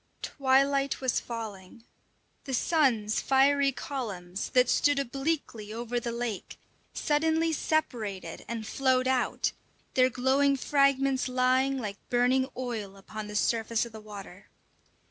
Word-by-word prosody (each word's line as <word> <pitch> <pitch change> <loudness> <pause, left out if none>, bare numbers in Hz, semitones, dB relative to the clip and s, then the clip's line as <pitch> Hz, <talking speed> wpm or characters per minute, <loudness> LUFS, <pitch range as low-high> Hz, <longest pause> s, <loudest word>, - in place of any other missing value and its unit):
Twilight 275 0 +2
was 260 -2 +1
falling. 220 -2 -8 0.6
The 265 -3 -1
sun's 235 -8 +2
fiery 275 +1 +4
columns, 205 -9 -5
that 250 -1 +4
stood 290 +3 +3
obliquely 270 -5 -2
over 240 +2 -2
the 235 0 -4
lake, 235 -4 -4 0.3
suddenly 320 +2 +1
separated 215 - -2
and 230 -1 -4
flowed 255 +2 +1
out, 260 -2 +1 0.4
their 255 0 +4
glowing 270 +3 +2
fragments 275 -1 +2
lying 255 +2 +2
like 210 -5 -4
burning 255 +2 +2
oil 220 -6 -4
upon 210 +2 -7
the 210 - -7
surface 225 +1 +1
of 235 - -10
the 220 0 -10
water. 200 -3 -11
255 Hz, 125 wpm, -29 LUFS, 220-275 Hz, 0.6 s, fiery